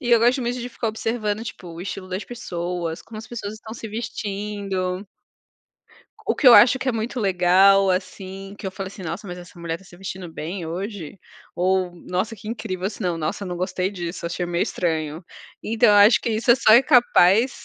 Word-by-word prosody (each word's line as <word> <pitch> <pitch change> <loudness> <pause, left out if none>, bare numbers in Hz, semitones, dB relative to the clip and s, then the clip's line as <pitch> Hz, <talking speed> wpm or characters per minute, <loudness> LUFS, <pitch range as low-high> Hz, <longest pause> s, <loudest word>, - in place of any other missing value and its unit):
E 245 -3 -2
eu 235 - +7
gosto 245 +4 +3
muito 245 0 -2
de 245 0 -5
ficar 230 - -3
observando 220 -1 -2
tipo 190 -5 -8
o 165 0 -9
estilo 185 0 -6
das 185 +2 -4
pessoas, 175 -7 -4
como 220 - -10
as 220 - -9
pessoas 215 -3 -6
estão 220 +1 -10
se 225 - -7
vestindo. 200 -3 -4 1.2
O - - +1
que 280 - 0
eu 240 - +10
acho 255 +2 +7
que 255 - -2
é 255 - +2
muito 230 +3 -3
legal, 195 0 +5
assim, 190 +1 -4
que - - -6
eu - - -2
falei 190 0 -6
assim: 195 0 -11
"Nossa, 170 +5 -5
mas 180 -2 -6
essa 175 0 -13
mulher 170 -1 -3
tá 195 - -19
se 175 - -15
vestindo 185 -2 -7
bem 170 +4 -5
hoje", 190 +1 -6 0.4
ou 185 0 +1
nossa 185 +5 -3
que 210 0 -10
incrível 190 -5 -4
assim 210 +2 -5
não, 175 -2 -1
nossa 160 +5 -3
não 180 -2 -4
gostei 185 +1 -1
disso, 175 -3 -6
achei 175 +1 -3
meio 175 0 0
estranho, 160 -1 -2 0.4
então 225 +2 +3
eu 210 - +6
acho 205 +3 +7
que - - -2
isso 225 +2 +4
só 220 - +5
é 235 +4 +8
capaz 245 - +4
195 Hz, 205 wpm, -23 LUFS, 180-225 Hz, 1.2 s, eu